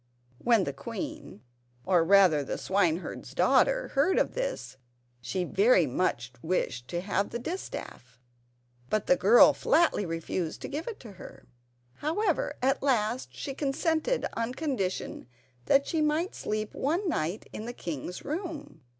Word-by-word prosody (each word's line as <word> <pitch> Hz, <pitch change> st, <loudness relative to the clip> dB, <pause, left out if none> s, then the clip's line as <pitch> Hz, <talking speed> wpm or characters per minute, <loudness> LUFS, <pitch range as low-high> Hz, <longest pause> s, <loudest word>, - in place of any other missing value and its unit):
When 230 Hz, -4 st, +3 dB
the 140 Hz, -, -3 dB
queen—or, 140 Hz, -, -4 dB
rather, 180 Hz, -5 st, +5 dB
the -, -, -4 dB
swineherd's 185 Hz, -3 st, -1 dB
daughter—heard 380 Hz, -, +3 dB
of -, -, +1 dB
this, -, -, -4 dB, 0.4 s
she 125 Hz, +10 st, -2 dB
very 195 Hz, 0 st, +4 dB
much 125 Hz, -3 st, -1 dB
wished 130 Hz, -8 st, -2 dB
to 175 Hz, 0 st, -3 dB
have 200 Hz, +1 st, -1 dB
the 235 Hz, -, -4 dB
distaff, 235 Hz, -, -7 dB, 0.7 s
but 215 Hz, -, 0 dB
the -, -, +5 dB
girl 210 Hz, +7 st, +7 dB
flatly 330 Hz, -10 st, +2 dB
refused 165 Hz, 0 st, -3 dB
to -, -, -3 dB
give 300 Hz, +4 st, -5 dB
it 460 Hz, -, -5 dB
to 230 Hz, -, -10 dB
her. 190 Hz, -, -12 dB, 0.5 s
However, 335 Hz, +4 st, 0 dB
at 270 Hz, +1 st, +2 dB
last 245 Hz, -2 st, 0 dB
she 275 Hz, -, -5 dB
consented 315 Hz, -, 0 dB
on 230 Hz, +2 st, -2 dB
condition 250 Hz, -, -3 dB, 0.4 s
that 275 Hz, 0 st, +4 dB
she 320 Hz, -, -1 dB
might 305 Hz, +5 st, +1 dB
sleep 215 Hz, 0 st, -3 dB
one 340 Hz, +8 st, -1 dB
night 175 Hz, -, -2 dB
in 215 Hz, -, -6 dB
the -, -, -3 dB
king's 170 Hz, -, -6 dB
room. 310 Hz, -2 st, -5 dB
220 Hz, 140 wpm, -28 LUFS, -, 0.7 s, girl